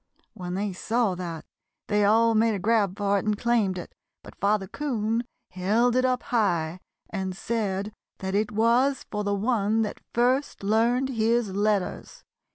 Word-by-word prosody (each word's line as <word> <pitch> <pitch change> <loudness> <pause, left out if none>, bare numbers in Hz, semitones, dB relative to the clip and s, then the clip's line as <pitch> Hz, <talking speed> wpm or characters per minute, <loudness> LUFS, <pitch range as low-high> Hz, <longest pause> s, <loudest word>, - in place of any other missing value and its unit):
When 180 -4 -5
they 200 0 -2
saw 225 +2 0
that 170 -3 -6 0.4
they 210 0 +1
all 225 +2 +4
made 220 0 +3
a - - -1
grab 205 -1 +1
for 200 -1 +1
it - - -6
and 210 -1 +1
claimed 225 -5 +1
it, 175 - -8 0.3
but - - -12
Father 200 0 +1
'Coon 230 -2 -1 0.3
held 215 +7 +2
it 255 0 +3
up 255 -1 0
high 180 -7 0 0.3
and 190 -1 -3
said 205 -2 -2 0.2
that 190 0 -4
it 210 +1 +1
was 235 +6 +2
for 210 -1 -2
the 205 0 0
one 220 0 +1
that 210 - -5
first 255 +1 +1
learned 235 +5 +2
his 230 -2 +1
letters. 205 -2 -1
215 Hz, 165 wpm, -26 LUFS, 195-235 Hz, 0.4 s, all